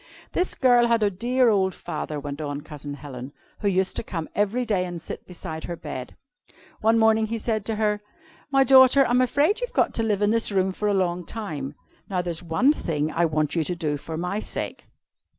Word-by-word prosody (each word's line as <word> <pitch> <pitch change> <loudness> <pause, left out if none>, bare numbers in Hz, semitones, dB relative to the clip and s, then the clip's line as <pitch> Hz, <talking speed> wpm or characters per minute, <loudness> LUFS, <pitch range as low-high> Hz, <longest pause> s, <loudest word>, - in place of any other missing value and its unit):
"This 360 - 0
girl 245 -2 +5
had 230 -2 +2
a 205 - +2
dear 245 +6 +2
old 190 -3 +2
father," 150 -1 -5
went 145 +1 -6
on 145 -1 -4
Cousin 145 -2 -8
Helen, 135 -2 -8 0.3
"who 205 - -1
used 190 -1 +1
to - - -1
come 165 -7 -4
every 210 +5 0
day 200 -5 +1
and 175 -1 -5
sit 165 - -8
beside 160 -3 -6
her 175 - -4
bed. 145 -6 -7 0.6
One 225 +1 +3
morning 220 0 +4
he 230 +1 -2
said 220 -1 -1
to 225 - -1
her: 210 -1 0 0.5
"'My 270 -1 +4
daughter, 265 +1 +7
I'm 245 +1 +3
afraid 290 - +2
you've - - -3
got - - +2
to - - -1
live 210 -2 +1
in 205 - +3
this 230 -1 +1
room 190 -1 +2
for 210 +3 -2
a 205 - +2
long 180 -2 0
time. 150 -10 -5 0.3
Now 180 -2 -1
there's 170 -2 -4
one 180 - +3
thing 155 - -2
I 170 +2 +2
want 155 -1 0
you 165 - +2
to 175 +3 -3
do 155 -4 -1
for 160 +2 -6
my 180 +5 -2
sake.' - - -5
195 Hz, 215 wpm, -25 LUFS, 160-230 Hz, 0.6 s, daughter